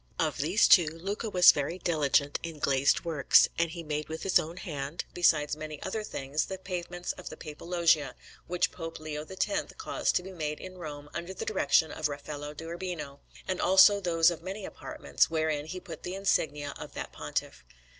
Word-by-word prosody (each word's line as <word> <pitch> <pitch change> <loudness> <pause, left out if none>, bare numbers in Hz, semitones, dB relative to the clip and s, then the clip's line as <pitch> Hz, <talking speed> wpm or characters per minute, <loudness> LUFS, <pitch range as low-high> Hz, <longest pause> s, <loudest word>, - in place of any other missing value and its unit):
Of 155 -2 0
these 170 +9 +4
two, 175 -4 +7
Luca 195 +8 -4
was 180 -3 +8
very 145 +5 -3
diligent 145 -5 +1
in 165 -2 -6
glazed 140 +2 +2
works, 155 -5 +5
and 170 0 +2
he 170 +1 -7
made 150 0 -3
with 160 0 -5
his 190 - +4
own 165 +3 -5
hand, 145 -2 -5
besides 150 -4 +3
many 155 -1 -7
other 215 +3 -3
things, 140 -5 -2
the 190 - -5
pavements 175 -1 -4
of - - -9
the 155 - -9
Papal 150 +2 -9
Loggie 170 -5 +3 0.4
which 180 0 +1
Pope 165 -2 -7
Leo 155 -1 -5
X 190 0 0 0.3
caused 440 - -1
to 180 - +1
be 190 - -8
made 150 -4 -4
in 185 0 -9
Rome 145 -3 -7
under 180 +3 -5
the - - -5
direction 160 -6 +2
of 155 -1 -1
Raffaello 145 +1 -6
da 160 - -8
Urbino, 170 -5 -5 0.3
and 185 -1 -1
also 190 +2 +7
those 170 -3 +3
of 170 - -6
many 190 +3 -6
apartments, 70 -1 -1
wherein 155 -2 -1
he 185 +3 -5
put 170 -3 -9
the 180 - -5
insignia 150 -7 0
of - - -9
that - - -5
Pontiff. - - -4
165 Hz, 195 wpm, -29 LUFS, 150-180 Hz, 0.4 s, was